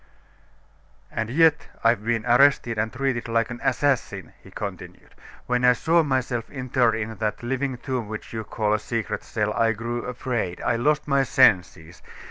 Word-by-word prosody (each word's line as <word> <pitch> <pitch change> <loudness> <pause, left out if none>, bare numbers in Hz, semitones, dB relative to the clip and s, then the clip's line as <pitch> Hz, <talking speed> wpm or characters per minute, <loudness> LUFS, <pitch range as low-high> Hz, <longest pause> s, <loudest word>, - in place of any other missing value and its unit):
"And 110 0 -3
yet 160 +3 +3 0.2
I've 115 -2 +3
been 115 -1 -1
arrested 125 -2 +4
and 110 +1 -1
treated 130 -2 -2
like 115 0 0
an 120 - -6
assassin," 140 -4 0
he - - -15
continued. - - -8 0.3
"When 125 0 0
I 125 0 +6
saw 165 +7 +2
myself 130 -5 -2
interred 125 -3 +1
in 110 -1 -4
that 110 +2 -3
living 130 +1 -2
tomb 125 -2 -4
which 110 +2 -8
you 110 -1 -4
call 105 0 -1
a 110 - +1
secret 115 +1 -3
cell, 105 -1 -2
I 115 -1 +2
grew 120 +2 -4
afraid; 120 -7 -3
I 115 - +1
lost 150 +5 +1
my 140 -1 +3
senses. 90 - +2
120 Hz, 165 wpm, -24 LUFS, 110-130 Hz, 0.3 s, I